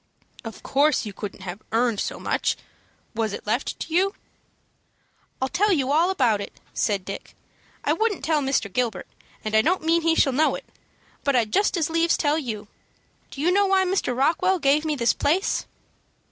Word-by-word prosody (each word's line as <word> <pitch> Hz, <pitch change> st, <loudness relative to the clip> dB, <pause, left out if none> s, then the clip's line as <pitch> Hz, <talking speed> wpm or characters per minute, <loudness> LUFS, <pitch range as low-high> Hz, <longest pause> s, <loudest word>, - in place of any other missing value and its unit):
"Of 225 Hz, -2 st, -9 dB
course 290 Hz, -1 st, +2 dB
you 205 Hz, -, -6 dB
couldn't 200 Hz, -1 st, -7 dB
have 185 Hz, +2 st, -6 dB
earned 230 Hz, -2 st, +1 dB
so -, -, -3 dB
much. -, -, 0 dB, 0.6 s
Was 220 Hz, -2 st, -1 dB
it -, -, -7 dB
left 235 Hz, +6 st, -1 dB
to 320 Hz, -, -5 dB
you?" 385 Hz, +3 st, +2 dB, 1.2 s
"I'll 265 Hz, -, 0 dB
tell 405 Hz, +9 st, +2 dB
you 275 Hz, -6 st, +1 dB
all 330 Hz, +5 st, +3 dB
about 245 Hz, -, +2 dB
it," -, -, -9 dB
said 200 Hz, -4 st, 0 dB
Dick. 195 Hz, -, -7 dB, 0.5 s
"I -, -, +2 dB
wouldn't 435 Hz, -9 st, -1 dB
tell 310 Hz, -1 st, +2 dB
Mr. 265 Hz, -8 st, 0 dB
Gilbert, 235 Hz, -6 st, -1 dB, 0.4 s
and 215 Hz, -, -3 dB
I 220 Hz, -, +6 dB
don't 350 Hz, +6 st, +1 dB
mean 330 Hz, +1 st, +3 dB
he 330 Hz, 0 st, +2 dB
shall 270 Hz, -, +3 dB
know 310 Hz, +4 st, +2 dB
it, -, -, -8 dB, 0.6 s
but 280 Hz, -2 st, +1 dB
I'd 225 Hz, -3 st, +1 dB
just 400 Hz, -2 st, +2 dB
as 320 Hz, -3 st, +1 dB
lieves 330 Hz, 0 st, +2 dB
tell 300 Hz, +1 st, +1 dB
you. 220 Hz, -7 st, -5 dB, 0.6 s
Do 275 Hz, -, -7 dB
you 345 Hz, +4 st, +3 dB
know 400 Hz, +2 st, +3 dB
why 380 Hz, 0 st, +3 dB
Mr. 360 Hz, -10 st, 0 dB
Rockwell 340 Hz, +7 st, +2 dB
gave 300 Hz, 0 st, +2 dB
me 305 Hz, -1 st, 0 dB
this 235 Hz, -4 st, +2 dB
place?" 350 Hz, +7 st, 0 dB
285 Hz, 190 wpm, -24 LUFS, 225-335 Hz, 1.2 s, I